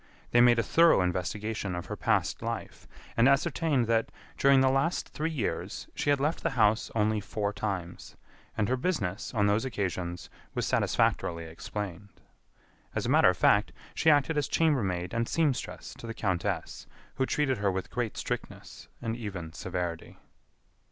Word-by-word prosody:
They 120 - +5
made 120 -1 +6
a 115 - +2
thorough 165 - +5
investigation 95 +2 -2
of 90 - -5
her - - -5
past - - 0
life, - - -5 0.3
and 120 +3 +5
ascertained 145 -2 +2
that, 115 0 +1 0.3
during 135 -1 +5
the 130 0 +4
last 135 +6 0
three 155 +2 -2
years, 145 -9 -3
she - - -2
had 145 -1 +3
left 150 +4 0
the - - +1
house 110 0 +3
only 110 0 +2
four 100 +1 -2
times, 95 -4 -5 0.4
and 105 - +1
her 130 - +1
business, 120 - -2
on 105 -2 +3
those 105 +2 +2
occasions, 95 -7 -3 0.3
was - - 0
satisfactorily 85 -1 +1
explained. 95 +3 -6 0.9
As - - -1
a - - -1
matter - - +6
of - - 0
fact, - - +3 0.2
she 160 - +3
acted 150 +1 +3
as 145 - -1
chambermaid 100 - +1
and 115 0 -1
seamstress 150 -6 -1
to 115 - -8
the 115 - -5
countess, 95 -4 -2 0.3
who 130 - +1
treated 135 -5 0
her 100 -1 +2
with 95 0 -4
great 120 -3 -2
strictness - - -6 0.2
and 115 -1 -1
even 95 -8 -6
severity. 90 -3 -4
110 Hz, 165 wpm, -29 LUFS, 95-135 Hz, 0.9 s, made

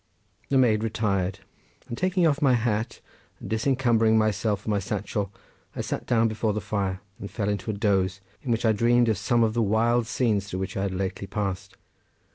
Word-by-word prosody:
The 135 - +3
maid 110 -4 +3
retired, 100 -4 -1 0.5
and 120 - -5
taking 185 +5 +1
off 150 -2 +2
my 135 -4 +4
hat, 115 -1 -1 0.4
and - - -8
disencumbering 115 -2 +2
myself 105 -1 +1
of - - -18
my 105 -2 +1
satchel 100 0 -3 0.4
I - - -2
sat - - -4
down 115 -2 +3
before 110 -1 -1
the 105 - -1
fire 95 -2 -2 0.2
and 100 - -6
fell 105 -3 -2
into 105 +1 -3
a - - 0
doze, 95 -2 +1 0.2
in 130 - -7
which 115 +1 0
I 110 - +5
dreamed 120 +2 +3
of 105 -4 0
some 115 +3 +2
of 110 -1 +1
the 120 - +1
wild 115 +2 +2
scenes 110 -4 0
through 95 - -3
which 95 0 -4
I 95 - -1
had 100 -1 -1
lately 95 +1 -3
passed. 95 -2 -4
110 Hz, 200 wpm, -26 LUFS, 100-115 Hz, 0.5 s, I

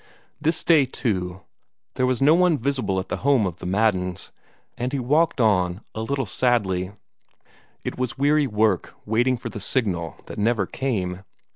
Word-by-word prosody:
This 160 +1 +1
day, 155 -5 +5
too, 95 -8 -2 0.5
there 130 - +1
was 130 +1 +1
no 150 +3 +6
one 175 -2 +4
visible 120 -7 -1
at 95 - -6
the - - -2
home 135 -5 +3
of 90 -3 -3
the 90 - -7
Maddens, 95 -2 0 0.4
and 125 +1 -3
he 140 - -1
walked 145 +5 +2
on, 95 -4 +2
a 110 - -4
little 135 +3 -1
sadly. 100 -4 0 0.9
It - - -5
was 130 +1 -2
weary 145 +1 +3
work 105 -4 0
waiting 120 +4 +2
for 120 - -6
the 105 - -7
signal 95 -7 -1
that - - -8
never 105 -1 +2
came. 95 -8 -3
115 Hz, 165 wpm, -23 LUFS, 95-135 Hz, 0.9 s, no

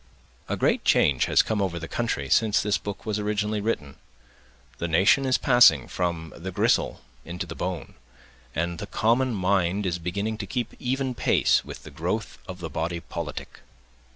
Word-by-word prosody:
A - - -1
great - - +1
change 65 -4 +3
has - - +4
come 110 -2 -1
over 90 -3 -1
the 85 -1 -6
country 115 -13 -2
since 110 +7 +3
this 105 0 0
book 100 -1 -7
was 105 -1 -1
originally 105 0 -1
written. 75 -11 -3 0.8
The 85 - -1
nation 95 +11 +4
is 130 - +3
passing 120 - +5
from 85 -3 -3
the 90 +3 -6
gristle - - +1 0.2
into 90 +1 -5
the 80 - -7
bone, 90 -1 -4 0.6
and 85 +2 -2
the 105 - -5
common 120 +5 +2
mind 95 0 +1
is 90 -2 -1
beginning 100 +6 -3
to 100 - -4
keep 125 -3 -3
even 130 +1 -1
pace - - +2
with - - -10
the - - -11
growth - - -3
of 90 -1 -8
the 80 - -4
body 85 +3 -2
politic. - - -7
95 Hz, 175 wpm, -25 LUFS, 85-110 Hz, 0.8 s, passing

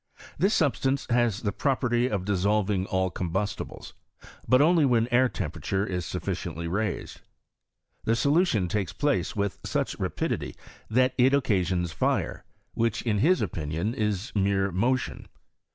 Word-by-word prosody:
This 195 +7 +2
substance 135 -2 +1
has 120 -3 +2
the 105 - -1
property 125 +1 +1
of 100 -3 -2
dissolving 100 0 +1
all 95 -1 0
combustibles; 95 +4 -4 0.5
but 130 - +6
Duly 160 +3 +4
when 120 -4 +3
their 125 +1 +4
temperature 95 +2 -2
is 90 -4 -3
sufficiently 85 0 -4
raised. 100 +3 -3 0.8
The 115 - +3
solution 140 - +2
takes 95 -3 -2
place 145 -2 0
with 100 -2 -2
such - - -2
rapidity - - -2 0.3
that 130 +3 +3
it 130 +3 +5
occasions 95 - 0
fire, 75 - -1 0.3
which 115 -2 0
in 105 -4 0
his 175 - +3
opinion 80 +4 -2
is 105 0 -2
mere 100 -1 +1
motion. 120 +8 -1
105 Hz, 135 wpm, -27 LUFS, 95-130 Hz, 0.8 s, but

